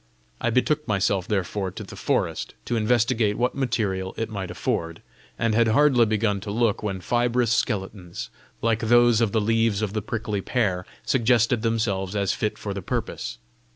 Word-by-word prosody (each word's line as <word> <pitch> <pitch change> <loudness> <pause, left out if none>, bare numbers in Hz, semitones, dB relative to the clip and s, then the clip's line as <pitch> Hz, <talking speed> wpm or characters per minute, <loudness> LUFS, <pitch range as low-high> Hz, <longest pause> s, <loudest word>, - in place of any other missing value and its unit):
I 120 - +1
betook 150 +6 +1
myself 100 -2 +1
therefore 95 -1 -1
to 90 - -8
the - - -10
forest, - - -1
to 120 - -1
investigate 115 -1 +2
what 125 +1 +1
material 105 -8 -1
it 115 0 -3
might 95 -4 -4
afford, 85 -1 -3 0.3
and 115 -1 +1
had 115 +1 +4
hardly 125 0 +4
begun 105 -1 +1
to 105 - -7
look 110 0 +1
when 100 -3 -3
fibrous 120 +1 +1
skeletons, 95 -6 -3 0.3
like 115 -1 +2
those 120 0 +4
of 115 -3 +2
the 110 - +2
leaves 115 -1 +1
of 105 -2 -2
the 110 - -1
prickly 105 -1 -3
pear, 95 -6 -1 0.2
suggested 120 -2 +3
themselves 105 -4 -1
as 100 -2 +1
fit 105 - -2
for 100 - -4
the 100 - -5
purpose. - - -4
110 Hz, 170 wpm, -24 LUFS, 100-120 Hz, 0.3 s, had